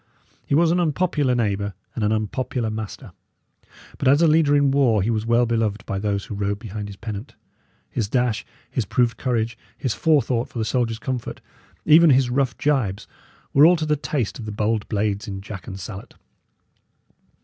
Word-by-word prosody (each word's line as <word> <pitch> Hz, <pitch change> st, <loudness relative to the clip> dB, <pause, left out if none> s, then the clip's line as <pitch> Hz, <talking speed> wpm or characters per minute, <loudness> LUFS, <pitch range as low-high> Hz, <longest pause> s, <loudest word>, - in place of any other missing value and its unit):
He 140 Hz, -, +2 dB
was 165 Hz, +1 st, +4 dB
an 175 Hz, -, +2 dB
unpopular 150 Hz, -5 st, +1 dB
neighbour 100 Hz, -3 st, -1 dB, 0.2 s
and 115 Hz, -, -3 dB
an 105 Hz, -, +2 dB
unpopular 110 Hz, +2 st, -2 dB
master; 110 Hz, -1 st, -6 dB, 0.9 s
but 135 Hz, -, 0 dB
as 145 Hz, +5 st, +5 dB
a -, -, +6 dB
leader 155 Hz, -2 st, +4 dB
in 145 Hz, -1 st, +3 dB
war 125 Hz, -8 st, +3 dB
he 115 Hz, -, 0 dB
was 110 Hz, 0 st, -2 dB
well 120 Hz, +1 st, +4 dB
beloved 110 Hz, -3 st, -1 dB
by 95 Hz, -, -3 dB
those 100 Hz, -1 st, -1 dB
who -, -, -7 dB
rode 100 Hz, 0 st, -1 dB
behind 105 Hz, -1 st, -6 dB
his 100 Hz, -, -9 dB
pennant. 105 Hz, +4 st, -7 dB, 0.5 s
His 105 Hz, -4 st, -3 dB
dash, 120 Hz, -2 st, 0 dB, 0.3 s
his 125 Hz, -, 0 dB
proved 120 Hz, +4 st, +1 dB
courage, 115 Hz, -2 st, -1 dB, 0.2 s
his 130 Hz, -5 st, -1 dB
forethought 130 Hz, -7 st, +1 dB
for -, -, -9 dB
the 110 Hz, -, -1 dB
soldiers' 115 Hz, -1 st, 0 dB
comfort, 125 Hz, +1 st, -4 dB, 0.5 s
even 160 Hz, +2 st, +7 dB
his 130 Hz, -2 st, +4 dB
rough 130 Hz, -1 st, 0 dB
gibes, 120 Hz, -10 st, 0 dB, 0.5 s
were 140 Hz, -, +6 dB
all 180 Hz, -, +6 dB
to 155 Hz, -2 st, -2 dB
the 150 Hz, 0 st, +2 dB
taste 140 Hz, -6 st, -3 dB
of 115 Hz, -, -6 dB
the 105 Hz, -, -5 dB
bold 105 Hz, +1 st, -1 dB
blades 105 Hz, -1 st, -1 dB
in 95 Hz, -1 st, -5 dB
jack 100 Hz, -2 st, -9 dB
and 95 Hz, -, -7 dB
salet. 95 Hz, +1 st, -8 dB
115 Hz, 185 wpm, -23 LUFS, 105-135 Hz, 0.9 s, even